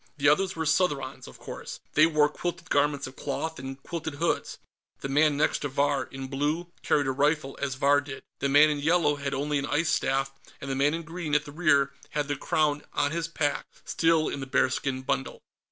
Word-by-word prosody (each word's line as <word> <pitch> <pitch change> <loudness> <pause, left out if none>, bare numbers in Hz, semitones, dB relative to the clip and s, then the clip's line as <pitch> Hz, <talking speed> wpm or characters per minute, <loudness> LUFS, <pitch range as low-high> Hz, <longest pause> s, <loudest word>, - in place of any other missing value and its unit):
The 145 0 +2
others 190 +5 +2
were 160 0 -2
Southrons, 145 -5 0
of - - -12
course; - - -8
they 155 +1 +6
wore 155 -2 +4
quilted 175 +3 -5
garments 145 0 +2
of 130 - -9
cloth, 160 +2 -4
and 135 +1 -6
quilted 160 -3 -5
hoods. 165 +3 -1 0.4
The 135 - -4
man 145 +1 +3
next 150 - +2
to 145 - -2
Vahr, 140 0 +1
in 135 0 -7
blue, 150 +6 -2
carried 145 - +2
a 135 - +1
rifle, 145 0 +1
as 140 -2 -1
Vahr 145 +1 +4
did. 140 -2 -8 0.2
The 140 - 0
man 150 +2 +6
in 145 - -2
yellow 150 -1 +2
had 140 -1 -3
only 145 +1 0
an 140 - -3
ice 155 +2 +1
staff, 135 -2 0 0.3
and 135 - -5
the - - -1
man 145 +3 +2
in 165 - -5
green, 165 -2 -3
at 150 - +2
the 145 - -9
rear, 140 -4 +2 0.2
had 150 -1 -2
the 145 - -1
Crown 150 +1 +1
on 145 -1 +1
his 165 0 -2
pack, 145 -3 -1 0.2
still 165 -1 +2
in - - -3
the 135 - -5
bearskin 130 0 0
bundle. 135 +1 -2
145 Hz, 215 wpm, -27 LUFS, 140-155 Hz, 0.4 s, they